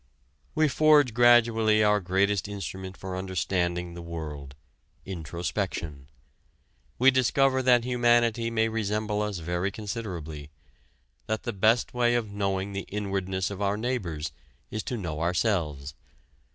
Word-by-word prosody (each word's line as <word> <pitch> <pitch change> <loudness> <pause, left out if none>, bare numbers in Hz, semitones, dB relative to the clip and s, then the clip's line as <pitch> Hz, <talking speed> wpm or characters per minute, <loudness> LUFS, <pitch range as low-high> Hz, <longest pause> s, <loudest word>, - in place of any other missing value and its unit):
We 155 0 +4
forge 150 -2 +4
gradually 115 -2 +5
our 105 0 +4
greatest 100 +2 +1
instrument 95 -2 -6
for 95 -1 -6
understanding 90 -1 -2
the 85 - -8
world 75 -5 -7 0.5
introspection. 80 -4 -4 0.9
We 130 +2 +6
discover 130 +1 +2
that 125 -2 +4
humanity 120 -2 +2
may 115 -1 +1
resemble 105 -1 -1
us 105 -2 -2
very 90 +3 -2
considerably 90 -9 -6 0.8
that 110 0 -2
the - - -3
best 110 +5 +2
way 120 -1 +2
of 110 -4 -1
knowing 100 -1 -2
the 100 0 -5
inwardness 95 -2 -2
of 100 0 -6
our 100 0 +1
neighbors 90 - -3 0.4
is 110 - -2
to 125 - -3
know 80 -6 -4
ourselves. 85 -6 0
100 Hz, 125 wpm, -27 LUFS, 90-115 Hz, 0.9 s, We